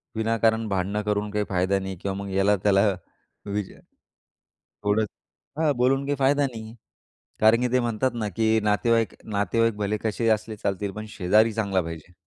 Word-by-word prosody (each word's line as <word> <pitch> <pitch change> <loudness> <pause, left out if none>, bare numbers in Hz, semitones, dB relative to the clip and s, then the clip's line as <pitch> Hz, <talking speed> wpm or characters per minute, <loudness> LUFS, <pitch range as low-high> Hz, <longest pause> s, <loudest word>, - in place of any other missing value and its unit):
विनाकारण 110 0 +1
भांडणं 100 +2 -1
करून 105 0 -1
काही 105 -1 -1
फायदा 95 +1 +1
नाही 95 0 -5
किंवा 95 -1 -2
मग 100 0 -5
याला-त्याला 100 0 +3 0.6
विज 100 -1 -3 1.1
ओढत 105 +1 +2 0.5
हां, 155 -2 +3
बोलून 135 +3 +2
काही 145 +1 0
फायदा 140 +1 +3
नाहीये. 110 -3 -9 0.7
कारण 110 +2 +5
की 125 - +2
ते 125 - +3
म्हणतात 120 +2 0
ना, 110 -3 -3
की 110 +3 +2
नातेवाईक 115 +2 +2
नातेवाईक 110 +2 +1
भले 105 0 -1
कशेही 110 +1 0
असले 110 0 -1
चालतील 100 -1 -2
पण 110 +2 -7
शेजारी 105 +4 +3
चांगला 100 -4 0
पाहिजे. 85 +1 -8
105 Hz, 155 wpm, -25 LUFS, 100-115 Hz, 1.1 s, कारण